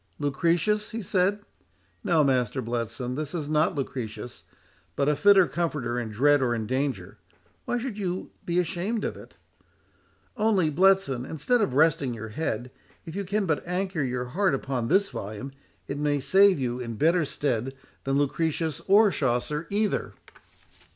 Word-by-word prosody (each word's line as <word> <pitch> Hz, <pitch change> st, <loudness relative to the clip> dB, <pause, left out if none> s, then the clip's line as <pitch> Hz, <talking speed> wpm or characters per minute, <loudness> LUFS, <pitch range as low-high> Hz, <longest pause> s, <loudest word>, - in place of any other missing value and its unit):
"Lucretius?" 170 Hz, +9 st, +1 dB
he 230 Hz, -, -5 dB
said; 195 Hz, +3 st, +1 dB, 0.6 s
"no, 170 Hz, -7 st, +3 dB
Master 130 Hz, -2 st, +1 dB
Bletson, 120 Hz, +1 st, -3 dB
this 155 Hz, +3 st, -4 dB
is 155 Hz, -4 st, -3 dB
not 155 Hz, +3 st, +2 dB
Lucretius, 125 Hz, -4 st, -5 dB, 0.5 s
but 140 Hz, -, +1 dB
a 150 Hz, -, +3 dB
fitter 195 Hz, +4 st, +6 dB
comforter 145 Hz, -8 st, -2 dB
in 115 Hz, -2 st, -4 dB
dread 145 Hz, +6 st, +3 dB
or 120 Hz, -2 st, +1 dB
in 110 Hz, -2 st, -3 dB
danger—Why 130 Hz, -, -4 dB
should 240 Hz, -3 st, -4 dB
you 185 Hz, -2 st, -3 dB
be 170 Hz, 0 st, -2 dB
ashamed 190 Hz, +5 st, -1 dB
of -, -, -2 dB
it? -, -, -14 dB, 1.0 s
Only, 210 Hz, -8 st, +2 dB
Bletson, 185 Hz, -6 st, +3 dB
instead 225 Hz, -, 0 dB
of 130 Hz, -11 st, 0 dB
resting 145 Hz, -5 st, +3 dB
your 110 Hz, 0 st, -7 dB
head, 120 Hz, -1 st, -3 dB, 0.3 s
if 165 Hz, -, -8 dB
you 200 Hz, -, -2 dB
can 200 Hz, +2 st, -1 dB
but 155 Hz, -4 st, 0 dB
anchor 180 Hz, -2 st, -1 dB
your 125 Hz, -2 st, -2 dB
heart 175 Hz, +5 st, +1 dB
upon 130 Hz, -3 st, -3 dB
this 195 Hz, +6 st, +3 dB
volume, 110 Hz, +7 st, -6 dB, 0.4 s
it 140 Hz, -, -4 dB
may 145 Hz, -1 st, +1 dB
serve 190 Hz, +8 st, +5 dB
you 125 Hz, -2 st, -2 dB
in 115 Hz, -2 st, -5 dB
better 165 Hz, +7 st, +3 dB
stead 135 Hz, -3 st, -2 dB, 0.3 s
than 135 Hz, 0 st, 0 dB
Lucretius 160 Hz, +1 st, -1 dB
or 205 Hz, +1 st, +6 dB
Chaucer 150 Hz, +4 st, -1 dB
either." 210 Hz, +1 st, -1 dB
150 Hz, 155 wpm, -26 LUFS, 125-185 Hz, 1.0 s, fitter